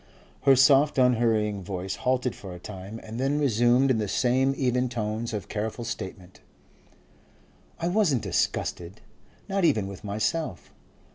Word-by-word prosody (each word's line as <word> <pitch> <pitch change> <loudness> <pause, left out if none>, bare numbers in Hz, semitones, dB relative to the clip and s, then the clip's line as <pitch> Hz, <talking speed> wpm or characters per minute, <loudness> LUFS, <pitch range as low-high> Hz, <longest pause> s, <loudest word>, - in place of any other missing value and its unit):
Her 135 -1 +7
soft 140 +3 +5
unhurrying 115 -5 +2
voice 95 0 -5
halted 125 -1 0
for 95 -3 -9
a - - -10
time, 100 +3 -8
and 110 +2 -7
then 135 +3 +1
resumed 125 -1 +3
in 115 - +1
the 105 - -1
same 130 +5 +1
even 125 -1 +1
tones 110 -1 -3
of 105 -3 -4
careful 110 +3 -4
statement. 95 -3 -7 1.4
"I 170 - -1
wasn't 175 - +2
disgusted, 85 +1 -2 0.5
not 195 -1 -1
even 135 - +3
with 95 -1 -9
myself. 105 - -3
120 Hz, 140 wpm, -26 LUFS, 105-135 Hz, 1.4 s, Her